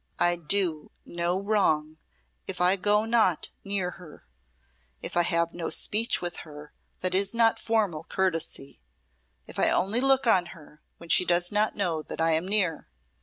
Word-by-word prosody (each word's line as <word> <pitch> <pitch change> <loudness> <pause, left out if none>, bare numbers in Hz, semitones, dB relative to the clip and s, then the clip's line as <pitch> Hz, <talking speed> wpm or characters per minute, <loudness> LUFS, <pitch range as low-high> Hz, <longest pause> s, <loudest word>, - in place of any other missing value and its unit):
"I 175 0 +2
do 170 -2 -1 0.2
no 175 +2 -2
wrong 160 -7 0 0.5
if 190 - -5
I 180 +2 +4
go 210 +2 +1
not 225 -7 +1
near 195 -3 -2
her 165 - -14 0.7
if - - -7
I 175 - +4
have 170 -1 0
no 170 -2 -4
speech 220 -2 0
with 175 0 -4
her 150 -1 -11 0.3
that 185 0 -1
is 195 +3 +1
not 230 -1 +3
formal 210 -9 -1
courtesy 165 - -2 0.6
if - - -8
I - - +4
only 200 +7 +1
look 270 0 +3
on 185 -6 +3
her 150 -1 -18 0.2
when 170 - -13
she - - +5
does 175 0 +1
not 210 +1 +1
know 175 -6 -1
that - - -9
I 165 0 +2
am 160 +3 0
near. 190 -6 0
180 Hz, 170 wpm, -26 LUFS, 165-205 Hz, 0.7 s, she